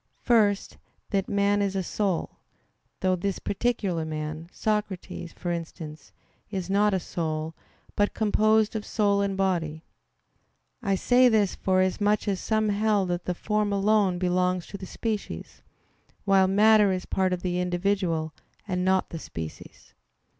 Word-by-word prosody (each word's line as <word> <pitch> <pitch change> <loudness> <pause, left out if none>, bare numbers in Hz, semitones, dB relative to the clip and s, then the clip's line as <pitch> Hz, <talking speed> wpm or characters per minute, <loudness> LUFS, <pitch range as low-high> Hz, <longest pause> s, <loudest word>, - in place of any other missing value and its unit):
First, 210 -5 +2 0.3
that 195 -2 0
man 200 0 +2
is 195 -1 -1
a 190 - 0
soul; 190 -1 -2 0.6
though 185 -1 +2
this 190 +1 -2
particular 200 -6 -1
man, 155 +1 -5
Socrates, 210 -5 -3
for 175 - -4
instance, 160 -3 -7 0.4
is 190 -1 -4
not 205 0 +3
a - - +1
soul, 160 -2 -3 0.4
but 205 0 +1
composed 215 0 +3
of 215 - -2
soul 200 -2 +1
and 195 -1 -1
body. 165 -5 -1 1.0
I 200 -4 +1
say 250 +6 +5
this, 210 -4 +2
forasmuch 190 +3 +1
as 195 -2 0
some 215 -1 +1
held 205 -2 +1
that 175 0 -2
the 180 - -1
form 210 +2 0
alone 200 -2 +2
belongs 180 0 +1
to 200 - -6
the 190 - -7
species; 220 0 -5 0.6
while 195 -1 +5
matter 210 +1 +5
is 185 -1 -2
part 190 -1 0
of 180 -1 -2
the 180 -1 -1
individual, 175 -3 0 0.3
and 180 -2 -1
not 190 0 +1
the 165 - -5
species. 80 - -9
195 Hz, 145 wpm, -26 LUFS, 180-205 Hz, 1.0 s, say